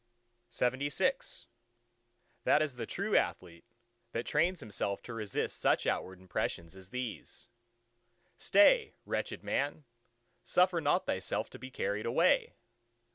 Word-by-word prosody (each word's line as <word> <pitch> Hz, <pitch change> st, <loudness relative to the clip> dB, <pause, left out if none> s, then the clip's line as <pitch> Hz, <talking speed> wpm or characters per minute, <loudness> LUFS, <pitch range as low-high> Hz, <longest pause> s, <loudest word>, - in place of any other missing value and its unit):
LXXVII 130 Hz, +3 st, 0 dB, 1.0 s
That 150 Hz, -, +5 dB
is 150 Hz, -3 st, -3 dB
the 125 Hz, -, -5 dB
true -, -, -1 dB
athlete, 85 Hz, -2 st, 0 dB, 0.5 s
that 115 Hz, -, -2 dB
trains 170 Hz, +4 st, +1 dB
himself 100 Hz, -2 st, -3 dB
to 120 Hz, -, -7 dB
resist 105 Hz, -3 st, -3 dB
such -, -, +3 dB
outward 95 Hz, 0 st, -2 dB
impressions 85 Hz, -1 st, -3 dB
as 95 Hz, -1 st, -13 dB
these. 125 Hz, -1 st, -6 dB, 0.9 s
"Stay, 440 Hz, -, +4 dB
wretched -, -, -3 dB
man! 145 Hz, +2 st, -1 dB, 0.6 s
suffer 180 Hz, -2 st, +3 dB
not 145 Hz, -1 st, +2 dB
thyself -, -, -2 dB
to -, -, -10 dB
be 130 Hz, +2 st, -8 dB
carried 105 Hz, -4 st, -2 dB
away!" 115 Hz, -, +3 dB
125 Hz, 120 wpm, -32 LUFS, 100-150 Hz, 1.0 s, That